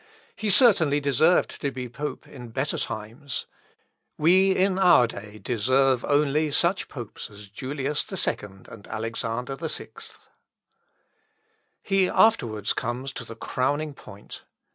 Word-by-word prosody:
He 215 - -2
certainly 180 - +5
deserved 145 +5 +2
to 140 - 0
be 130 -2 -6
pope 145 +5 -6
in 125 -3 -10
better 135 +5 -2
times. 115 +6 -5 0.7
We, 185 +5 +5
in 190 0 +2
our 175 -10 +6
day, 105 -2 -8
deserve 130 +3 +2
only 150 +1 +2
such 170 +6 +1
popes 120 -6 -8
as 105 -1 -12
Julius 140 - -3
II, 190 - 0 0.3
and 110 -3 -12
Alexander 115 +3 -3
VI." 160 0 -4 1.9
He 195 -2 +2
afterwards 120 - +2
comes 125 +3 -3
to 120 - -7
the 115 -1 -10
crowning 145 +6 -1
point. 100 -6 -12
135 Hz, 120 wpm, -25 LUFS, 115-160 Hz, 1.9 s, our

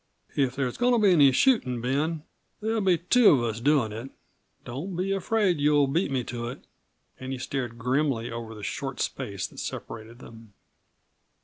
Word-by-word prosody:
"If 130 -3 +1
there's 130 -3 -2
goin' 245 0 +3
to - - +4
be 205 -4 +4
any 145 -6 +6
shootin', 130 - +2
Ben, 145 +6 -1 0.4
there'll 220 +1 -1
be 185 -3 +3
two 210 +7 +5
of 130 -5 +4
us 115 -1 -2
doin' 130 -4 +2
it. 115 +5 -7 0.6
Don't 155 +10 -5
be 185 +3 -1
afraid 195 -1 +1
that - - -5
you'll 145 -1 +4
beat 155 +7 0
me 130 -2 -1
to 120 0 -5
it." 125 - -8 0.5
And 130 0 -6
he 135 - -3
stared 125 -2 -4
grimly 125 -1 0
over 115 -1 -6
the 105 - -10
short - - -4
space - - -3
that - - -9
separated 115 +1 -7
them. 115 -3 -14
135 Hz, 185 wpm, -26 LUFS, 120-175 Hz, 0.6 s, any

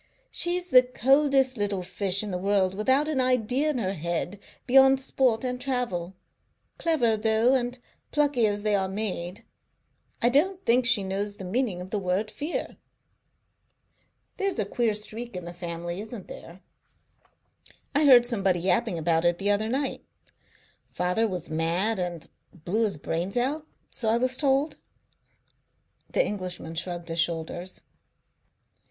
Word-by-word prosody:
She's 355 +1 0
the 255 - +9
coldest 265 +1 +2
little 200 -3 -1
fish 190 +2 0
in 210 - -5
the 180 - -2
world, 195 -1 +1
without 260 +9 +2
an 295 -4 +1
idea 255 +3 +1
in 295 - -1
her 195 -5 -1
head 170 +3 -3 0.3
beyond 265 +1 +6
sport 255 -3 +1
and 250 -1 -3
travel. 235 -9 -2 0.6
Clever, 260 -10 +2
though, 220 +3 +2
and 245 -1 0 0.3
plucky 285 -6 +2
as 205 0 -2
they 210 -1 +1
are 190 -1 +1
made. 190 -2 -3 0.7
I 240 - +3
don't 365 +9 +2
think 245 +1 +3
she 245 -6 +3
knows 200 +2 -3
the 195 - -9
meaning 195 -1 -1
of 185 +2 -9
the 210 - 0
word 195 +3 -1
fear." 300 +4 -4 1.6
"There's 395 -5 -1
a 215 - +1
queer 220 +1 0
streak 220 +1 -5
in 180 -1 -6
the 175 - -7
family, 170 +1 -5
isn't 215 -2 -9
there? 175 +3 -11 1.3
I 295 +1 +3
heard 250 -4 +8
somebody 195 -7 +1
yapping 180 -1 +1
about 165 0 +1
it 175 0 +2
the 200 +2 +1
other 215 +2 +1
night. 270 +3 -2 0.9
Father 180 +6 0
was 180 -5 -5
mad 175 +7 0
and 175 -3 -4 0.2
blew 185 +7 -1
his 200 -7 -2
brains 170 +8 -3
out, 295 +5 -1 0.2
so 225 - -1
I 225 - +3
was 255 +1 +1
told." 275 +2 +1 1.3
The - - +2
Englishman 180 -5 -5
shrugged 170 0 -4
his 165 +1 -2
shoulders. 170 +2 -3
215 Hz, 150 wpm, -26 LUFS, 180-255 Hz, 1.6 s, the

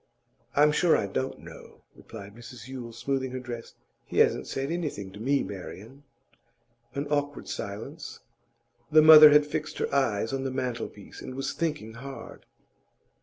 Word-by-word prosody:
'I'm 150 +1 +5
sure 165 +2 +3
I - - -1
don't 130 +7 -4
know,' - - -13
replied 100 -2 -11
Mrs 120 0 -11
Yule, 125 -3 -7
smoothing 130 +2 -2
her 130 - -3
dress. 120 -2 -8 0.3
'He - - -7
hasn't - - +3
said 135 +3 -3
anything 150 - -4
to 100 - -12
me, 135 +5 +1
Marian.' 105 +7 -9 0.9
An 140 +1 -2
awkward 145 -1 -1
silence. 115 +11 -7 0.7
The 155 0 +7
mother 155 -1 +11
had 150 0 +5
fixed 155 +1 -4
her - - -2
eyes 115 -4 +1
on 135 0 -2
the 135 - -2
mantelpiece, 125 -5 -5
and 130 - -8
was 135 - -3
thinking 150 -9 -3
hard. 135 +4 -10
135 Hz, 155 wpm, -27 LUFS, 115-145 Hz, 0.9 s, mother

